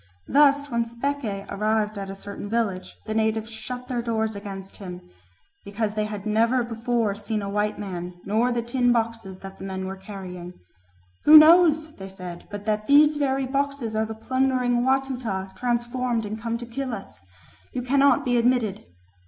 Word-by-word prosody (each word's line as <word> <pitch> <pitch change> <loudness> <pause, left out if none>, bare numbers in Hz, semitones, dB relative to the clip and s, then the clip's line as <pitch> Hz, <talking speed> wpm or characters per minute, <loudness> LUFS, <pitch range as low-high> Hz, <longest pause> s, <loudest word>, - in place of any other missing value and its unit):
Thus 285 0 +4
when 235 0 +1
Speke 235 -4 -3
arrived 215 +1 0
at 195 -1 -5
a 195 - -6
certain 200 +1 -8
village, 200 -5 -2
the 215 - -3
natives 220 0 0
shut 250 +3 -6
their 245 -2 -1
doors 220 -2 -1
against 195 -1 -8
him, 180 - -9 0.6
"because 205 +1 -2
they 215 0 -1
had 210 -1 -6
never 230 +4 +2
before 230 -2 -1
seen 210 +1 -3
a 200 - -3
white 210 +1 0
man 180 -3 -5
nor 225 +5 +2
the 240 -1 -1
tin 245 +1 +2
boxes 225 -5 -1
that 195 0 -10
the - - -8
men 190 -1 -4
were 190 0 -4
carrying: 185 -2 -8 0.7
'Who 310 - +11
knows,' 315 -1 +6
they 195 0 -8
said, 180 -2 -9
'but 205 0 -7
that 215 -1 -1
these 295 +1 +6
very 270 -2 0
boxes 275 -3 -2
are 220 0 +1
the 220 - -6
plundering 255 0 +1
Watuta 250 -8 -1
transformed 240 -1 -1
and 215 +2 -5
come 230 0 -2
to 240 - -7
kill 255 +1 -4
us? 195 - -10 0.5
You 250 - -3
cannot 275 +2 +3
be 245 -1 +2
admitted.' 235 -4 +1
225 Hz, 175 wpm, -25 LUFS, 200-250 Hz, 0.7 s, Who